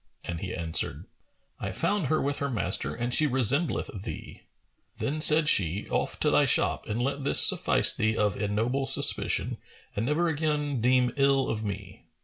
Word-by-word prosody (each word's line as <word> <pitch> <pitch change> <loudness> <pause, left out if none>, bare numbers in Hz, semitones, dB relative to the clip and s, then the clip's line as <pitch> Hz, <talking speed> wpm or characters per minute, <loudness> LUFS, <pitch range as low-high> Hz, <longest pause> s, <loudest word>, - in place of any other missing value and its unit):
and 85 -1 -6
he 95 0 -6
answered, 80 -2 -4 0.5
"I - - -5
found 205 -7 -2
her 155 +3 0
with 140 +1 -3
her 140 - -4
master; 120 - -1
and 120 +1 -4
she 155 - +2
resembleth 135 - -2
thee." - - -10 0.6
Then 155 +2 -4
said 155 0 +7
she, 95 - +1
"Off - - -3
to - - +1
thy - - +3
shop - - 0
and 105 +2 -4
let 140 +3 -3
this 140 - +4
suffice - - +3
thee 110 0 -2
of 105 -3 -1
ignoble 115 +6 -3
suspicion 135 - +2 0.4
and 105 - -3
never 160 +4 0
again 150 -4 -3
deem 125 0 +1
ill 135 -1 +1
of 110 -1 -4
me." 100 -2 -8
130 Hz, 170 wpm, -26 LUFS, 110-145 Hz, 0.6 s, said